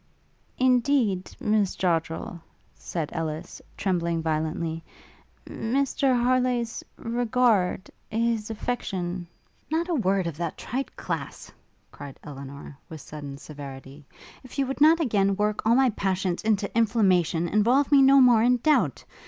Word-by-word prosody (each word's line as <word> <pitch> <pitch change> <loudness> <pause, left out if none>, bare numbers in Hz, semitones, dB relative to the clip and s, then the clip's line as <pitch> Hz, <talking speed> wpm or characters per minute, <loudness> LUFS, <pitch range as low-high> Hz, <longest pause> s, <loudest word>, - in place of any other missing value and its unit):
'Indeed, 250 -6 +2
Miss 210 -3 +1
Joddrel,' 165 -1 -2 0.3
said 160 -4 -5
Ellis, 160 +1 -5 0.2
trembling 170 -4 -1
violently, 160 +1 -2 0.6
'Mr 265 +1 0
Harleigh's 250 -2 0
regard 230 -5 +1 0.2
his 225 -1 -1
affection 185 -6 -3 0.2
' - - -39
'Not 335 +3 0
a - - +1
word 195 - +1
of 165 -3 -4
that 170 -2 -4
trite 265 +2 -4
class!' - - -5 0.4
cried 140 -2 -10
Elinor, 140 0 -9
with 160 - -8
sudden 145 -1 -8
severity, 140 -1 -10 0.4
'if 255 - -12
you 275 - +2
would 270 +2 -5
not 320 +2 +6
again 200 -9 +1
work 210 +1 -1
all 230 - +5
my 260 -1 +4
passions 190 -3 -1
into 210 -2 0
inflammation 190 -7 +2
involve 240 - +2
me 280 -1 +7
no 270 +1 +7
more 245 -4 +6
in 250 +2 +4
doubt! 240 - +1
205 Hz, 130 wpm, -26 LUFS, 165-245 Hz, 0.6 s, me